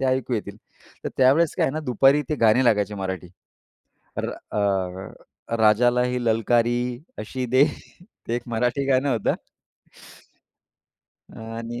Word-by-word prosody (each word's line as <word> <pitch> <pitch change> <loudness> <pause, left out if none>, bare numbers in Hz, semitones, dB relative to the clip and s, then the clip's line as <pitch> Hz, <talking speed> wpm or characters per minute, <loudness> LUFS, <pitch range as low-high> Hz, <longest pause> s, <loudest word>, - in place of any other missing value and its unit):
ते 135 - -1
ऐकू 130 -1 0
येतील. 100 -1 -5 0.5
तर - - -1
त्यावेळेस 140 +5 +4
काय - - +2
आहे 135 - 0
ना, 155 - -3
दुपारी 135 +5 +4
ते 155 - 0
गाणे 125 +4 +5
लागायचे 105 -3 +2
मराठी. 95 -2 -5 0.9
तर - - -2
अ, 95 +2 -4
राजाला 120 +3 +4
ही 125 0 -1
ललकारी 120 +1 +2 0.4
अशी 125 +4 -4
दे, 130 +3 +4 0.6
ते 115 - 0
एक 120 - -2
मराठी 120 +4 0
गाणं 135 +1 +2
होतं. 115 -4 +1 2.1
आणि 115 +1 -6
120 Hz, 130 wpm, -23 LUFS, 105-130 Hz, 2.1 s, गाणे